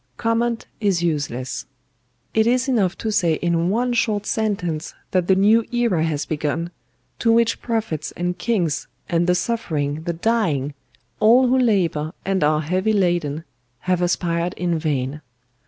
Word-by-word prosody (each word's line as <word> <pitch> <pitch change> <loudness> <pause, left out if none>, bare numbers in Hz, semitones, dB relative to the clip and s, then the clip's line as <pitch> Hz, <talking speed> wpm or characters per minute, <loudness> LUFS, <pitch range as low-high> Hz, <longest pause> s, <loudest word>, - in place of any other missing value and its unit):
"Comment 230 0 0
is 195 -5 +1
useless. 145 -6 -2 0.7
It 220 0 +3
is 250 +2 +2
enough 210 -9 +1
to 220 - -2
say 170 -6 +2
in 170 +1 0
one 240 +4 +1
short 215 -3 0
sentence 180 -7 -2 0.2
that 180 -2 +1
the 190 - +5
new 215 +4 +4
era 235 -9 +1
has 150 -3 -1
begun, 155 +2 -2 0.5
to 230 - +3
which 230 0 +2
prophets 220 -10 -2
and 175 0 -2
kings, 180 - -1 0.2
and 170 0 +1
the 180 - +4
suffering, 160 -9 -1
the 170 - -1
dying, 165 - 0 0.5
all 240 +4 +6
who 260 +1 +3
labour 175 -10 +1
and 190 -3 +1
are 150 +1 +3
heavy 185 +7 0
laden, 175 -6 0 0.4
have 180 -1 0
aspired 175 0 0
in 175 -2 -1
vain. 145 -2 -2
180 Hz, 150 wpm, -22 LUFS, 160-220 Hz, 0.7 s, all